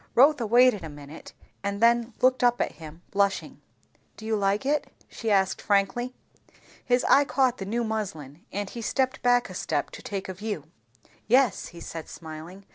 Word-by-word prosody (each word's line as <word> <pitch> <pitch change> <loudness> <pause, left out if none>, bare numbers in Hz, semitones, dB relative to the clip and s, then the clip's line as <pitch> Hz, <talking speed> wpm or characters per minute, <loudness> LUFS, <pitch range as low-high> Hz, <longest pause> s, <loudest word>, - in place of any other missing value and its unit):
Rotha 270 -2 +5
waited 240 -2 +5
a 160 - -6
minute, 145 +1 -11 0.3
and 200 0 -2
then 235 0 +3
looked 255 0 +3
up 245 0 +4
at - - 0
him, 160 +1 -12
blushing. 200 0 0 0.6
"Do 220 - -10
you 220 0 0
like 200 +3 0
it?" 295 +2 0 0.2
she 225 - -5
asked 195 -2 +2
frankly. 205 +5 0 0.7
His 245 0 +2
eye 280 - +6
caught 260 -3 +1
the 195 - -5
new 235 +2 0
muslin, 175 - -5
and 205 0 -3
he 235 +4 -7
stepped 260 +3 0
back 245 0 +3
a 185 - -9
step 155 -4 -2
to - - -10
take 195 -2 -5
a 190 - -4
view. 205 -4 -4 0.6
"Yes," 250 -1 +3
he 170 - -12
said 165 -1 -7
smiling. 165 +4 -10
210 Hz, 180 wpm, -26 LUFS, 185-245 Hz, 0.7 s, eye